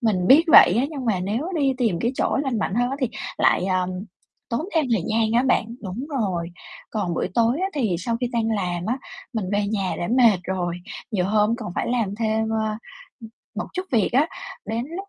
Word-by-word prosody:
mình 200 -7 +1
biết 290 - +7
vậy 205 - +8
á, 255 - +3
nhưng 280 -5 -5
mà 200 -5 +1
nếu 220 - -2
đi 275 -3 +2
tìm 220 -9 +1
cái 235 +2 0
chỗ - - 0
lành 265 -5 -1
mạnh 195 - -1
hơn 245 +2 +1
á 275 - -2
thì 255 - +1 0.3
lại, 180 - +3
ờm, 185 -1 0 0.6
tốn 235 - -1
thêm 320 -2 +3
thời 215 -7 +2
gian 220 0 +1
á 240 +2 +4
bạn, 260 -4 +2 0.2
đúng 210 +7 -5
rồi. 175 -5 -1 0.4
Còn 185 -6 -2
buổi - - -1
tối 235 +4 +2
á 380 - +1
thì 220 - 0
sau 230 +6 -2
khi 250 - +1
đang 225 -1 0
làm 180 -5 -2
á, 245 +4 -1 0.3
mình 220 -4 -2
về 205 0 +1
nhà 200 -3 -1
đã 175 - -2
mệt 235 -5 +5
rồi, 180 -2 -2 0.4
nhiều 195 -5 0
hôm 210 +3 +2
còn 215 -7 -6
phải - - -1
làm 230 -5 0
thêm, 220 0 0
ơ, 220 -1 -1 0.4
ưm, 225 -1 -10 0.2
một - - -3
chút 370 0 -3
việc 220 -5 +3
á, 280 +6 +3 0.4
đến 230 +2 -2
lúc 390 +1 -7
220 Hz, 225 wpm, -23 LUFS, 195-245 Hz, 0.6 s, vậy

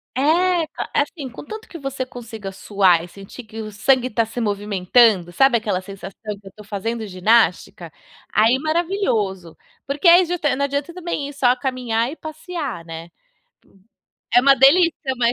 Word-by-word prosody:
É! 260 - 0
A 345 +3 +2 0.3
é - - +4
assim, 290 -1 -5
contanto 425 - -9
que 340 - -9
você 275 -1 -4
consiga 225 -5 -8
suar 190 -4 +2
e 175 - -9
sentir 195 +7 -12
que 220 +1 -8
o 215 0 -7
sangue 255 +4 +1
tá 230 +1 +1
se 225 +2 -7
movimentando, 205 -2 +2
sabe 255 +5 +4
aquela 205 -4 -2
sensação 200 +2 -8
que 200 - -17
eu - - -10
tô 210 - -12
fazendo 220 +2 -4
ginástica? 185 -4 +1 0.4
Aí 225 +5 +3
maravilhoso. 310 - -1 0.3
Porque 285 +5 0
aí 350 +2 +8
justa 320 -6 -1
não 280 - 0
adianta 280 +4 -3
também 345 -5 -4
ir - - -10
só 255 -2 +3
caminhar 250 -2 -2
e - - -8
passear, 310 - -6
né. 165 +1 -8 1.3
É 245 - +8
uma 275 +2 +6
delícia, 280 0 +4
mas 235 0 +2
245 Hz, 170 wpm, -21 LUFS, 205-285 Hz, 1.3 s, aí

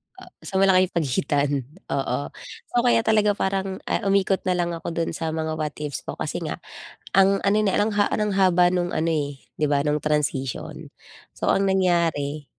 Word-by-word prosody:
Ah, - - -14
so 190 - -4
malaki 190 -1 +5
yung 180 - -27
pagitan, 145 -1 +1 0.4
oo. 135 -2 0 0.5
So 240 - +3
kaya 240 -2 +3
talaga 210 -2 +3
parang, 190 0 -1
ah, - - -1
umikot 195 -1 +2
na 180 - +2
lang 175 -1 0
ako 165 0 -5
dun 165 -1 -1
sa 160 0 -3
mga 160 0 -2
what-ifs 150 -1 -4
ko - - -4
kasi - - -3
nga - - -4 0.6
ang 195 0 +5
ano 200 +1 +2
na, 195 - +1
ang 210 +2 +2
ha 205 - +2
ng 210 -1 0
haba 180 -2 +5
nung 175 0 -1
ano, 165 +1 0
eh, 145 -4 -2 0.2
di 155 - +1
ba 145 -1 +2
nung 150 +1 +1
transition. 150 -4 -2 0.4
So - - -2
ang 195 - +3
nangyari, 170 -6 +1
175 Hz, 185 wpm, -24 LUFS, 150-195 Hz, 0.6 s, malaki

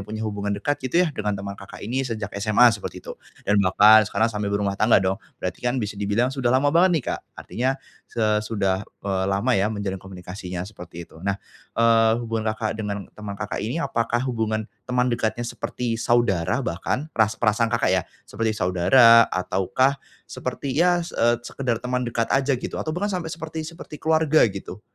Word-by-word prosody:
punya 110 +3 -5
hubungan 100 -1 -2
dekat 145 +8 -2
gitu 150 +8 +2
ya 155 - -3
dengan 105 -3 -2
teman 100 0 -5
Kakak - - -10
ini 130 +3 -2
sejak 110 -3 -4
SMA 110 +3 +5
seperti 105 - -6
itu - - -6 0.3
dan 105 0 +3
bahkan 105 +3 +7
sekarang 110 +3 +1
sambil 105 -1 -2
berumah 100 -1 0
tangga 110 +2 +5
dong 95 0 -1 0.2
berarti - - -4
kan 125 +1 0
bisa 105 -3 -2
dibilang 115 +6 +1
sudah 135 -3 -1
lama 135 +4 +3
banget 180 +3 +5
nih 140 - -2
Kak, - - -4 0.2
artinya, 125 +3 -2 0.5
eee, 110 -2 +2
sudah, 100 -3 -1 0.2
eee, 95 -1 0
lama 100 +6 +1
ya 100 -1 +2
menjalin 100 -3 -4
komunikasinya 90 -1 -7
seperti 85 -4 -10
itu 80 - -16
nah, 100 0 0 0.4
eee, 115 -1 +5
hubungan 115 -1 -3
Kakak, 110 -1 -3
dengan 100 -2 -4
teman 105 -1 -7
Kakak 105 - -3
ini 120 +10 -2
apakah 120 -4 0
hubungan, 110 -3 -1 0.2
teman 125 0 +1
dekatnya 120 0 -1
seperti 120 0 -3
saudara 120 -8 +1
bahkan 125 - -2
peras 110 -2 +2
perasaan 115 0 +2
Kakak, 115 - +1
ya 95 -2 +2 0.2
seperti 115 -1 -1
saudara 115 +6 +6
ataukah, 95 +9 +1 0.3
seperti 135 -2 -4
ya, 175 +3 +4
se - - -10
eee, 120 +1 +3
sekedar 125 -3 -2
teman 125 0 -1
dekat 115 -1 -1
aja 135 0 +2
gitu - - -6
atau 155 - -3
bahkan 205 +3 -1
sampai 160 -1 -6
seperti 160 -1 -5
seperti 165 -2 -10
keluarga 160 -1 +4
gitu, - - -8
110 Hz, 185 wpm, -23 LUFS, 100-125 Hz, 0.5 s, bahkan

